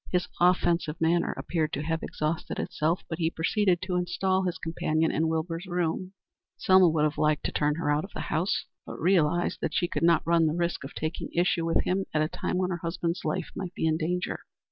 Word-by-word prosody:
His 180 -1 0
offensive 170 -3 +2
manner 170 +1 +2
appeared 155 -3 -1
to 145 - -2
have 160 +1 -1
exhausted 155 +3 -3
itself, 165 +4 -1
but 160 - -5
he 165 -1 +2
proceeded 180 +2 +1
to 185 -1 -1
install 180 +2 0
his 180 -2 -2
companion 160 -1 0
in 160 +1 +1
Wilbur's 165 +2 -2
room. 175 +1 -2 0.4
Selma 185 -2 +6
would 155 -1 +1
have 150 0 0
liked 150 -1 +2
to - - -1
turn 150 0 +1
her 160 -2 0
out 145 +1 +1
of 195 - -9
the - - -3
house, 175 +6 -1 0.2
but - - -8
realized 175 -1 +2
that - - -2
she 175 - +2
could - - -3
not 170 0 +4
run 165 -1 +4
the 155 - 0
risk 170 -2 -1
of 135 - -9
taking 155 +1 -3
issue 170 -1 +1
with 165 - +2
him 190 +1 0
at 155 - +3
a - - +1
time 180 - -3
when 185 0 0
her 175 - -1
husband's 170 +1 -2
life 155 - -2
might 185 -2 -5
be - - -1
in 160 -1 +3
danger. 180 +2 -2
170 Hz, 220 wpm, -28 LUFS, 160-180 Hz, 0.4 s, Selma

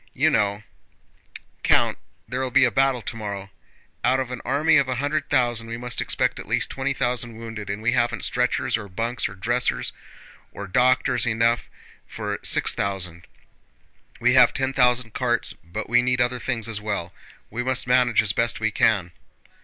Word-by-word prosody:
You 155 +5 +3
know, 105 -3 +1 1.0
Count, - - +3 0.3
there'll 130 +1 -2
be 125 - +4
a 125 - +3
battle 135 +1 +2
tomorrow. 100 -3 -6 0.5
Out 130 +2 +3
of 130 -1 -3
an 125 - -5
army 145 +6 +3
of 140 -2 +2
a 130 - 0
hundred 145 +3 -2
thousand 120 -4 +1
we 115 +1 -5
must 125 0 -3
expect - - 0
at - - -9
least - - 0
twenty 135 +1 -2
thousand 120 -3 -1
wounded, 115 -3 -7
and 100 +2 -4
we 120 - +2
haven't 120 -2 0
stretchers, 125 -1 0
or 105 -3 -8
bunks, 115 +4 -2
or 95 - -11
dressers, 115 - 0 0.6
or 100 - -7
doctors 125 +2 +2
enough 115 +1 +1 0.4
for - - -4
six - - +2
thousand. 90 -4 -4 0.9
We - - +3
have - - +6
ten 135 0 -1
thousand 125 -3 +2
carts, - - -1
but 85 +2 -6
we 120 +1 +4
need 125 0 0
other 125 0 +1
things 115 -4 -2
as 110 -2 -4
well—we 105 +3 -6
must 130 0 0
manage 125 -3 +3
as 105 -1 0
best 120 +1 0
we 110 0 0
can!" 100 -5 +2
120 Hz, 170 wpm, -24 LUFS, 110-125 Hz, 1.0 s, have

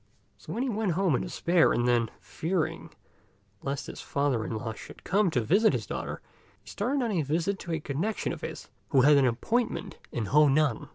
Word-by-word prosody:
So - - -7
he 250 +4 -1
went 215 -6 0
home 185 -2 +2
in 125 - +1
despair, 175 -1 +2
and 120 0 +1
then, 120 -2 +2
fearing 160 - -2 0.7
lest 135 -2 -3
his - - -8
father 140 -5 0
in 110 - -3
law 110 0 -4
should - - -12
come 200 0 +2
to 130 -7 +1
visit 200 - +4
his - - -2
daughter, - - -5 0.4
he - - -27
started 275 0 -1
on 230 - -1
a 180 -5 +1
visit 165 +7 -1
to 170 - -6
a 160 - 0
connection 155 +10 -2
of - - -8
his, - - -6 0.2
who 135 -4 +4
had 145 +3 +6
an 135 -2 +4
appointment 220 - -1
in 115 - -2
Honan. 150 0 +3
155 Hz, 195 wpm, -28 LUFS, 125-195 Hz, 0.7 s, had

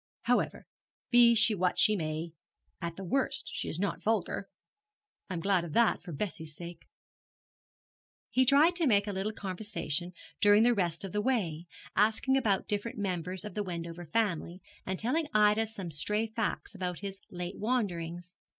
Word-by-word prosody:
However, - - +1 0.5
be 240 -1 +7
she 225 0 +4
what 185 -2 0
she 215 -1 +5
may, 160 -1 -3 0.5
at 170 -1 -4
the 195 - -7
worst 275 +7 0
she - - -3
is - - -2
not 200 +1 -1
vulgar. 205 -2 -1 0.8
I 185 - -3
am 165 - -3
glad 190 -1 +2
of 165 -3 -7
that, 235 +4 +3
for 175 - -9
Bessie's 160 -2 -5
sake.' 170 +1 -9 1.4
He 260 - +4
tried 290 +7 +5
to 335 -4 +2
make 205 -4 +4
a 205 - -3
little 195 +3 -1
conversation 185 -4 -3 0.3
during 205 +1 +6
the 240 +1 +5
rest 175 -5 -1
of 190 - -6
the 210 - 0
way, 180 -10 -1 0.3
asking 220 +6 +3
about 215 -8 +1
different 215 +4 -2
members 185 -1 -2
of 210 - -6
the 210 - -2
Wendover 170 -2 -5
family, 180 -2 -1 0.3
and 190 0 -1
telling 295 - 0
Ida 210 +1 +4
some 195 -6 -7
stray 210 +9 0
facts 220 -1 -3
about 180 -3 -4
his 195 -1 -6
late 180 0 -6
wanderings. 180 -7 -2
200 Hz, 170 wpm, -30 LUFS, 175-220 Hz, 1.4 s, be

